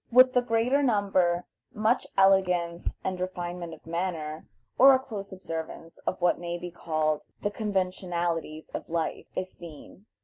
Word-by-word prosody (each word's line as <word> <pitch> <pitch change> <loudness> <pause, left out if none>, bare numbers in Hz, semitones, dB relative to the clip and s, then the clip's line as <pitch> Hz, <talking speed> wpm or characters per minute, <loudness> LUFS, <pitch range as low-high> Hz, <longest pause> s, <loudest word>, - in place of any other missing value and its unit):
With 255 +1 +7
the 250 - +4
greater 245 +4 +2
number 195 -8 +2 0.3
much 220 +4 +2
elegance 180 -3 +3
and 185 -1 -2
refinement 175 -2 -4
of - - -23
manner, 165 -2 -3 0.3
or 270 +1 +9
a - - +2
close 210 -7 -7
observance 165 -2 -6
of 185 - -1
what 175 -1 +2
may 175 0 -3
be 175 0 -7
called 155 -2 0 0.2
the 205 - 0
conventionalities 175 -6 -2
of - - -6
life, 165 -1 -2
is 185 0 -3
seen. 170 +5 -12
180 Hz, 145 wpm, -28 LUFS, 170-205 Hz, 0.3 s, or